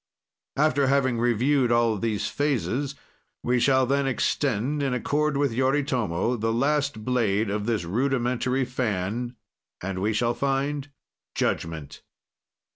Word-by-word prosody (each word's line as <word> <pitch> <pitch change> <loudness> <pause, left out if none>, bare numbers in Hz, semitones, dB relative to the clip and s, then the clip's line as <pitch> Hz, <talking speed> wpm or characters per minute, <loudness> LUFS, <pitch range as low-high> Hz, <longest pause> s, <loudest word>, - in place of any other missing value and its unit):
After 140 -2 +2
having 130 -3 +2
reviewed 120 +2 +2
all 120 -1 +3
these 110 0 -1
phases, 140 -1 -1 0.5
we 125 0 +2
shall 130 +1 +4
then 140 +1 +1
extend, 135 +1 0
in 135 -3 0
accord 150 +3 0
with 140 -4 +1
Yoritomo, 125 -5 0
the 115 +1 0
last 140 -1 0
blade 110 -5 +1
of 105 +1 -2
this 110 -6 0
rudimentary 125 +5 0
fan, 120 -1 -2 0.4
and 95 0 -4
we 105 +2 +1
shall 120 +2 +1
find 140 +2 -1 0.5
judgment. 80 -3 -2
125 Hz, 120 wpm, -25 LUFS, 115-140 Hz, 0.5 s, shall